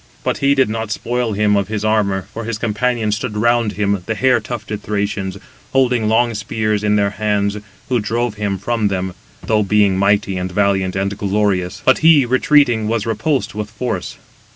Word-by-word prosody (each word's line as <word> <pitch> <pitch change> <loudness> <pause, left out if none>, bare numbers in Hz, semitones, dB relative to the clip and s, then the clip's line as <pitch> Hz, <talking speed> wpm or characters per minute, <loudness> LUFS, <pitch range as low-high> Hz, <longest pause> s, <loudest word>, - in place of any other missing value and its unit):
But - - -1
he 140 +1 +3
did 135 -1 +3
not 110 0 -3
spoil 120 +1 -2
him 105 0 +2
of 100 -1 0
his 110 0 -3
armour, 100 -3 +1
for 115 - -5
his 115 -2 -3
companions 110 -1 0
stood 105 -1 -4
round 120 -1 +2
him, 100 -2 0
the 110 - -1
hair 125 +1 +3
tufted 110 -2 -6
Thracians, 100 -2 -2 0.4
holding 125 -4 +2
long 115 +1 +2
spears 105 0 -2
in 105 0 +2
their 100 -1 +2
hands, 105 -1 -1 0.3
who 125 -2 +1
drove 115 +2 -1
him 105 -2 -2
from 110 +2 -1
them, 95 -1 -2 0.3
though 110 -1 +2
being 100 -2 +2
mighty, 100 -1 +2
and 90 0 -3
valiant, 95 -1 +1
and 100 +1 -1
glorious; 100 -2 -1
but 130 - +4
he, 155 -4 +6
retreating, 125 -3 +3
was 115 -1 -1
repulsed 130 +5 -1
with 105 0 -5
force. 105 -3 -4
105 Hz, 180 wpm, -18 LUFS, 100-115 Hz, 0.4 s, he